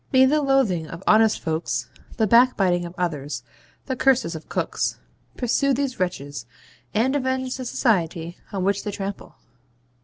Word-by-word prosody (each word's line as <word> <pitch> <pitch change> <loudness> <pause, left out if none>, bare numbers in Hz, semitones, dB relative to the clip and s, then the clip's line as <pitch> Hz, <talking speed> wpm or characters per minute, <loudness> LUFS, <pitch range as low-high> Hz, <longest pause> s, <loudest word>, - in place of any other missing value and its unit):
May 260 0 +6
the 300 +3 +3
loathing 260 - +2
of 165 +4 -9
honest 220 0 +4
folks, 155 -8 -2 0.3
the 220 - +3
backbiting 195 -6 +4
of 170 +1 -9
others, 145 -8 -3 0.4
the 260 - -2
curses 255 -10 +2
of 160 -1 -9
cooks, - - -1 0.4
pursue 270 +2 +2
these 270 -3 -2
wretches, 145 -8 -3 0.4
and 250 +6 +1
avenge 260 -1 -1
the 255 - -5
society 170 - 0
on 195 -2 -2
which 200 +1 +1
they - - -3
trample!) 200 0 -6
200 Hz, 150 wpm, -23 LUFS, 170-260 Hz, 0.4 s, May